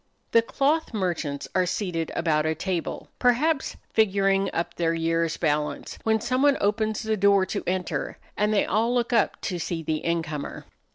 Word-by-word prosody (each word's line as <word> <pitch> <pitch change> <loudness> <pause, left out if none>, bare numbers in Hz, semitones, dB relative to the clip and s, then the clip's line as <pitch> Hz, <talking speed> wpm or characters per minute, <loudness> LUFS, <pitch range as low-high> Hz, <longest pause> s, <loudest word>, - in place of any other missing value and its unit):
The 230 - +6
cloth 280 +3 0
merchants 170 -7 -2
are 185 -1 +2
seated 180 -3 -2
about 155 -2 +1
a 160 - 0
table, 180 -2 -3
perhaps 270 +5 +2 0.2
figuring 195 -2 +3
up 170 0 -2
their 165 -1 0
year's 165 0 0
balance, 150 -2 -1
when 220 0 +2
someone 260 +5 +2
opens 215 +2 0
the 220 0 0
door 200 -1 +4
to - - -3
enter 185 0 -2 0.2
and 210 +1 +1
they 210 - +3
all 225 +4 +1
look 240 0 0
up 225 -3 +2
to 180 -4 -3
see 165 -1 -3
the 155 0 -2
incomer. 160 -3 -3
190 Hz, 165 wpm, -25 LUFS, 165-220 Hz, 0.2 s, The